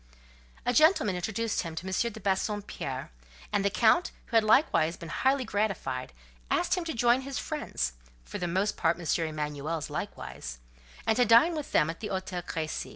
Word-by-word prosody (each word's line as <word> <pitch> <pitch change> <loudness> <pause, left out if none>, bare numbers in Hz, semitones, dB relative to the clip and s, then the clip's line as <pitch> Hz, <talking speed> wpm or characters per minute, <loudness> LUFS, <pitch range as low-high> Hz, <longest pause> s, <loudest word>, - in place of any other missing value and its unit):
A 245 - +2
gentleman 310 - +4
introduced 220 +5 -1
him 165 -2 -6
to 165 - -5
M. 190 - -4 0.2
de 220 - -9
Bassompierre; 190 - -2 0.4
and 200 - +2
the 200 - +3
Count, 230 - +4 0.2
who - - -6
had 225 - +6
likewise 175 - +3
been 165 - -8
highly 265 +7 +1
gratified, 195 - -2 0.4
asked - - +1
him 360 - 0
to 325 - -2
join 240 +2 +4
his 275 0 -5
friends 70 - -2 0.3
(for - - -6
the 175 - -1
most 190 +5 0
part 165 -1 +2
M. 165 -1 0
Emanuel's 150 0 -3
likewise), 60 0 -5 0.5
and 220 - +3
to 245 - +5
dine 240 +10 +6
with 300 -2 -5
them 150 - +4
at 165 +1 -5
the 215 - -4
Hôtel 185 -2 -3
Crécy. 160 -2 -4
195 Hz, 180 wpm, -29 LUFS, 165-230 Hz, 0.5 s, had